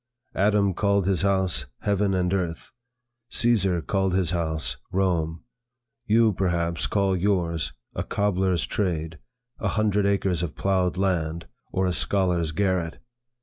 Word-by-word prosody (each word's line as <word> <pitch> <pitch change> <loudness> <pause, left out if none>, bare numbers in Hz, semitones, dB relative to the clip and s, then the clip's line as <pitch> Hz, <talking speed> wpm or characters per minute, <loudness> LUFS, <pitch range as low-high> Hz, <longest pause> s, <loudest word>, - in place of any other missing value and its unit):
Adam 100 -1 +2
called 100 0 +1
his 95 -2 +1
house, 95 -9 +1
heaven 100 -1 +1
and 90 0 0
earth; 85 -4 -3 0.6
Caesar 95 -8 +2
called 95 -2 0
his 90 -3 +2
house, 80 -7 -1
Rome; 85 -4 0 0.6
you 110 0 +4
perhaps 85 -3 0
call 100 -2 +1
yours, 85 -6 0 0.2
a - - -2
cobler's 95 -6 0
trade; 80 -1 -2 0.4
a - - -1
hundred 105 -2 +1
acres 95 -4 +1
of 85 -3 -4
ploughed 95 -2 0
land; 85 -4 -1 0.3
or 95 - 0
a 90 - +1
scholar's 90 -4 +1
garret. 90 -1 0
95 Hz, 130 wpm, -25 LUFS, 85-100 Hz, 0.6 s, you